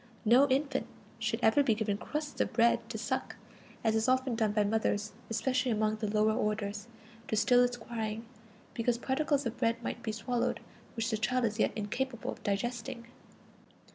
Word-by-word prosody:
No 250 +6 +6
infant 275 0 0 0.3
should - - -1
ever 220 +6 +5
be 240 -6 +3
given 210 -2 0
crusts 300 0 -3
of - - -1
bread 235 +1 +3
to - - -4
suck, - - -2 0.5
as 220 0 +2
is 220 +2 +1
often 260 0 +2
done 220 -2 +1
by 210 0 +2
mothers, 210 0 0 0.2
especially 255 +3 0
among 215 -1 +1
the 215 -1 -2
lower 215 +1 +3
orders, 210 -1 -2 0.4
to - - 0
still 245 +3 +5
its 245 0 0
crying, 225 -1 -4 0.5
because 235 +1 +1
particles 280 +2 0
of 235 +1 -3
bread 230 +1 0
might - - -4
be 220 - -2
swallowed, 240 +3 -1 0.4
which 230 0 -1
the 220 - +1
child 250 +3 +1
is 215 0 -2
yet - - +3
incapable 235 +4 -3
of - - -10
digesting. 235 +3 -2
230 Hz, 175 wpm, -31 LUFS, 215-250 Hz, 0.5 s, No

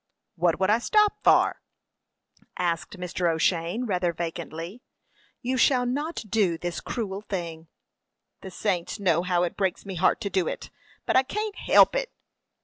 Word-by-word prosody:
"What 170 -1 +1
would 190 +1 +3
I 220 - +4
stop 420 - +3
for?" - - +4 1.0
asked 170 +3 -2
Mr. 180 -1 -1
O'Shane, 170 +7 0
rather 180 -5 0
vacantly. 170 +4 -6 0.6
"You 255 +2 0
shall 250 0 +4
not 290 +6 -2
do 190 -5 +1
this 175 +1 -4
cruel 200 -5 -4
thing." 170 -5 -5 0.7
"The 190 - -8
saints 185 0 -2
know 170 -4 +2
how 180 -1 +1
it 175 - -2
breaks 190 -1 -1
me 195 - -5
heart 180 +1 +2
to 200 - -2
do 185 -4 +1
it, - - -5 0.3
but - - 0
I 260 - +7
can't 420 +10 -4
help - - +5
it." - - -1
190 Hz, 155 wpm, -26 LUFS, 170-240 Hz, 1.0 s, I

